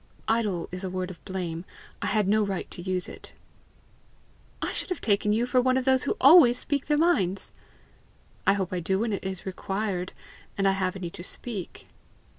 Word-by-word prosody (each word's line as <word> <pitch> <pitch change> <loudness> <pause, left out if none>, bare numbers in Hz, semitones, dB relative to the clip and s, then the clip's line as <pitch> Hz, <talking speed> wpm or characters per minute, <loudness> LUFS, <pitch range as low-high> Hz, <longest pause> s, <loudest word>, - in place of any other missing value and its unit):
"IDLE 210 -7 0
is 180 +1 -5
a 190 - -2
word 185 0 -3
of 170 - -14
blame; 175 -3 -4 0.4
I - - -1
had 210 -3 +2
no 215 +2 +4
right 195 -3 -2
to - - -7
use 185 0 -2
it." - - -11 1.3
"I - - -2
should - - -2
have 365 - -2
taken 210 -1 +2
you 225 +3 +2
for 250 0 +3
one 255 +1 +2
of 260 - -1
those 265 0 +3
who - - -1
always 270 -4 +8
speak 280 +1 -1
their 295 - +3
minds!" 200 - +1 1.0
"I 195 - +7
hope 190 -2 -2
I 180 - 0
do 190 +3 0
when 220 +1 0
it 200 - -3
is 190 -1 -5
required, 190 -1 -3 0.5
and 195 0 +2
I - - +5
have 190 -1 -1
any 180 -3 -5
to 175 - -8
speak." 200 -1 -6
195 Hz, 200 wpm, -27 LUFS, 185-240 Hz, 1.3 s, always